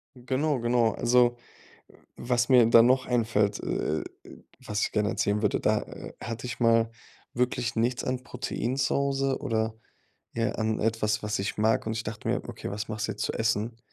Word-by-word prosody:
Genau, 130 +3 -1
genau. 120 -1 +2
Also, 120 0 +3 0.8
was 120 0 0
mir 125 -3 +7
dann 115 0 +7
noch 130 +1 +3
einfällt, 110 -4 +1
äh, 80 0 -1 0.6
was 105 0 -2
ich - - -1
gerne 105 0 +1
erzählen 105 0 0
würde, 105 - +1
da, 105 0 +2
äh, - - -9
hatte 115 +2 -5
ich 125 - -6
mal 115 -1 +3 0.4
wirklich 120 -2 -1
nichts 120 +2 0
an 130 0 -2
Protein 125 -1 -3
zu 135 -1 +1
Hause, 135 -1 0
oder, 110 -1 -1 0.6
ja, 115 0 0
an 110 -1 -1
etwas, 110 -1 0
was 105 -1 -2
ich 100 +3 -3
mag 110 +1 +2
und 110 - -2
ich 110 0 -3
dachte 105 -1 -6
mir: - - 0
„Okay, - - -6
was 105 +1 -4
machst 110 -1 -2
du 110 - -2
jetzt 105 +1 -4
zu - - -2
essen?“ 110 +1 -1
115 Hz, 185 wpm, -27 LUFS, 110-125 Hz, 0.8 s, mir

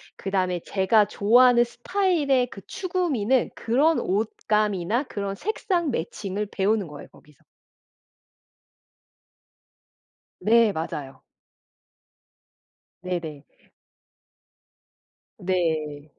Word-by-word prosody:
그다음에 185 -2 -1
제가 205 +2 +2
좋아하는 240 +4 +5
스타일의 280 0 0
그 195 - -10
추구미는 295 - 0
그런 285 +8 +2
옷감이나 210 +1 0
그런 200 -7 -5
색상 355 - -1
매칭을 200 +2 -4
배우는 200 -1 0
거예요 145 -1 -10
거기서. 150 -2 -22 2.9
네. 225 +2 +4
맞아요. 145 -6 -6 1.8
네네. 165 -5 -5 1.9
네. 160 -6 -2
205 Hz, 180 characters per minute, -24 LUFS, 180-250 Hz, 2.9 s, 좋아하는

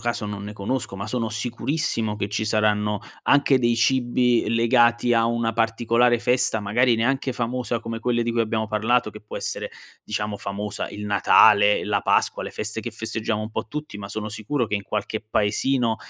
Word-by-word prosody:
caso 120 -2 -2
non 105 -1 -5
ne 105 +1 -6
conosco 105 +2 -3
ma 100 +2 -5
sono 115 -1 -2
sicurissimo 115 -1 -2
che 100 -1 -3
ci 105 +1 -2
saranno 105 -1 +1 0.2
anche 140 -2 +4
dei 120 -1 +2
cibi 120 -1 +2
legati 120 +1 +3
a 115 0 +3
una 115 -1 0
particolare 115 +1 +2
festa, 120 -2 +1
magari 120 +5 +2
neanche 135 +3 0
famosa 120 -1 -2
come 115 0 -5
quelle 120 0 0
di 115 - -1
cui 115 0 0
abbiamo 110 0 -1
parlato, 110 +2 +1
che 105 - -11
può 105 - -8
essere - - -4 0.3
diciamo 105 -1 -3
famosa, 100 +1 -4
il 105 0 -7
Natale, 105 0 +5
la 100 -1 0
Pasqua, - - +1
le - - -6
feste 110 +1 -4
che 120 - -4
festeggiamo 110 -1 -3
un 110 - -5
po' 110 - -4
tutti 150 -6 -6
ma 100 -1 -7
sono 105 +1 -4
sicuro 110 +4 -2
che 105 - -3
in 100 - -5
qualche 105 +1 -3
paesino 110 +3 0
115 Hz, 185 wpm, -23 LUFS, 105-120 Hz, 0.3 s, Natale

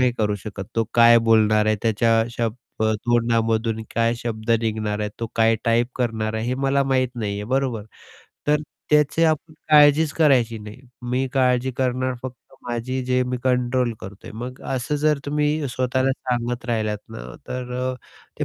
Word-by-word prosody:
नाही 125 -1 +3
करू 105 -2 +1
शकत. 100 -2 -6
तो 115 - +2
काय 115 0 +7
बोलणार 110 -1 +4
आहे, 110 0 +2
त्याच्या 115 0 +3
शब्द 115 -1 -4 0.2
तोंडामधून 115 -1 +1
काय 115 +1 +2
शब्द 115 -1 -4
निघणार 110 -1 -2
आहे, 105 0 -2
तो 115 - -1
काय 115 0 +4
टाईप 115 +1 +2
करणार 110 -3 -1
आहे, 110 +1 -2
हे 125 - 0
मला 140 +1 +3
माहीत 130 -1 +1
नाहीये, 105 -3 -3
बरोबर? 125 -6 -1 0.6
तर 150 0 +3 0.3
त्याची 150 +1 +3
आपण 155 0 0 0.2
काळजीच 150 +1 +6
करायची 125 -8 +3
नाही. 105 +3 -10 0.2
मी 125 +2 -1
काळजी 130 -1 +2
करणार 130 0 0
फक्त 130 -1 -6 0.3
माझी, 125 +2 -2
जे 125 0 +2
मी 125 0 -2
कंट्रोल 125 -1 +1
करतोय. 95 +1 -10
मग 125 +3 -7
असं 135 +3 -1
जर 150 -2 +3
तुम्ही 150 0 0
स्वतःला 130 +1 0
सांगत 120 -2 -3
राहिलात 110 -3 -1
ना - - -8 0.3
तर 125 -1 -5
अ, 130 0 -1 0.4
ते - - 0
120 Hz, 165 wpm, -22 LUFS, 115-130 Hz, 0.6 s, काय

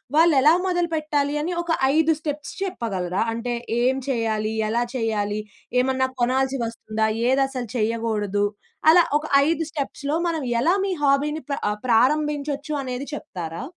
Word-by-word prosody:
వాళ్ళెలా 310 -2 +6
మొదలుపెట్టాలి 310 -5 0
అని 330 +4 -2
ఒక, 345 - -10 0.3
5 320 0 +4
స్టెప్స్ 295 -2 -5
చెప్పగలరా? 195 - -2
అంటే 235 +1 -3 0.3
ఏం 255 +2 +3
చేయాలి? 220 -3 0 0.2
ఎలా 235 +2 +1
చేయాలి? 215 -3 -1 0.4
ఏమన్నా 260 0 +1
కొనాల్సి 265 +2 +1
వస్తుందా? 220 -1 -2 0.2
ఏది 265 +2 +3
అసలు 250 -4 -5
చేయకూడదు? 215 -3 0 0.4
అలా 350 +2 +8 0.2
ఒక, 300 - -6 0.2
5 330 0 +1
స్టెప్స్‌లో 285 0 -3
మనం 330 -2 -1 0.2
ఎలా 335 +8 +3
మీ 390 - -1
హాబీని 290 +2 +2
పా - - +1 0.3
ప్రారంభించొచ్చు 290 +4 +1
అనేది 255 0 -4
చెప్తారా? 170 - -6
265 Hz, 130 wpm, -23 LUFS, 225-300 Hz, 0.4 s, అలా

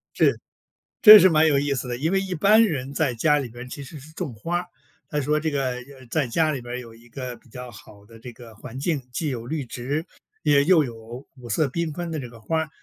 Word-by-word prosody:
是。 - - +3 0.6
这 215 -1 +12
是 185 -1 +6
蛮 155 0 +4
有 140 -2 +3
意 140 0 0
思 125 -1 -3
的， 120 - -3
因 160 +8 -1
为 195 - +2
一 190 -2 -4
般 210 +7 +5
人 140 - -1
在 140 -4 0
家 150 +5 +2
里 130 -4 -4
边 120 +2 -10
其 140 - -7
实 145 +3 -10
是 155 +3 -14
种 155 -8 -5
花 170 +12 -2
儿， 180 - -6 0.4
他 150 - -2
说 150 +2 0
这 160 0 -1
个， 135 -3 -1
呃， 130 +1 -9
在 150 -5 0
家 155 +5 +1
里 135 - -4
边 120 +1 -6
有 115 -2 -10
一 120 +1 -19
个 125 0 -6
比 130 - -23
较 125 +1 -9
好 105 -2 -15
的 115 +1 -16
这 125 +2 -10
个 115 -2 -13
环 125 +3 -9
境， 150 0 -1
既 150 +4 -3
有 120 -2 -5
绿 150 -1 -3
植 135 +7 -4 0.4
也 145 -2 +4
又 160 -1 +4
有 115 +2 -9
五 120 -1 -11
色 145 +7 +1
缤 165 +4 -2
纷 175 -1 -5
的 155 -2 -3
这 125 - -7
个 115 -1 -14
花 160 +8 -2
儿。 160 - -4
140 Hz, 275 characters per minute, -24 LUFS, 120-160 Hz, 0.6 s, 这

